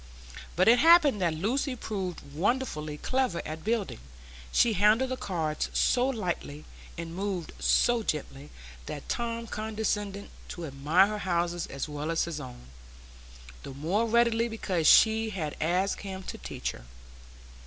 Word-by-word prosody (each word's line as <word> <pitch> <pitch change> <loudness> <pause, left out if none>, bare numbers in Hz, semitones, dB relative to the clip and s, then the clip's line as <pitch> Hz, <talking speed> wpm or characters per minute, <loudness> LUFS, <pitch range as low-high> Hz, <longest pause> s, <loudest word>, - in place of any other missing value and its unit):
But 185 +2 +3
it 240 +2 +7
happened 305 - +6
that 170 -3 +1
Lucy 255 - -1
proved 190 -7 -4
wonderfully 155 - -1
clever 255 - 0
at 155 +1 -6
building; 220 - -1 0.5
she 235 - +4
handled 215 +6 +3
the - - 0
cards 160 -9 -2
so 250 +1 +2
lightly, 175 - -4 0.3
and 165 0 -6
moved 190 -3 -3
so 240 -1 +3
gently, 150 -6 -4 0.4
that 145 - -7
Tom 230 -1 -2
condescended 210 -2 -3 0.2
to 175 - -6
admire 150 +6 +3
her 210 +1 -3
houses 175 -2 -1
as 135 +2 -5
well 150 +1 -4
as 165 - +1
his 165 -3 -4
own, - - -10 1.0
the 135 - -9
more 185 +11 0
readily 235 0 +3
because 190 -8 -1
she 220 0 +6
had 165 -8 -4
asked 180 +5 +1
him 190 -1 -6
to - - -7
teach - - -4
her. - - -13
195 Hz, 145 wpm, -28 LUFS, 160-225 Hz, 1.0 s, it